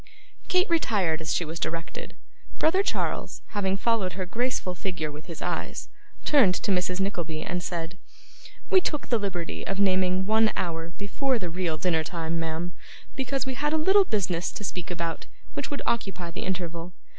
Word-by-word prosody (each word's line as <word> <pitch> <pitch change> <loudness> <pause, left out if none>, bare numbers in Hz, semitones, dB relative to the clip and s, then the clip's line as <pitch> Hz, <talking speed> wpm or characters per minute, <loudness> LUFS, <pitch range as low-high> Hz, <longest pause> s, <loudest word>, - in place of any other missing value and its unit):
Kate 365 +2 +4
retired 195 - +2
as 160 - -1
she 170 - +2
was 160 +2 -5
directed. 165 - -4 0.4
Brother 350 +5 +4
Charles, - - -1
having 195 -2 0
followed 210 -4 +1
her 185 -1 -2
graceful 225 -2 0
figure 170 -4 -2
with 150 +2 -9
his 165 -3 -6
eyes, - - -2 0.4
turned 240 -12 +6
to 205 - 0
Mrs. 180 0 +1
Nickleby, 175 -5 -1
and 180 -1 -2
said: 170 +1 -3 0.7
'We 380 -1 +7
took 300 -4 -2
the 235 - +3
liberty 180 -5 -3
of 195 0 -1
naming 185 -1 +3
one 220 +1 +5
hour 165 -1 -1
before 245 +9 0
the 180 -6 -3
real 170 -2 0
dinner 160 -1 +2
time, 165 0 -2
ma'am, 165 +2 -2 0.4
because 270 0 0
we 265 - -2
had 295 +4 0
a - - +4
little 385 +6 +6
business 185 - 0
to 210 - -5
speak 185 -1 -3
about, 170 -2 -3 0.3
which - - -3
would 285 - -3
occupy 195 -7 -1
the 170 - -4
interval. 175 -2 -3
185 Hz, 175 wpm, -27 LUFS, 170-230 Hz, 0.7 s, We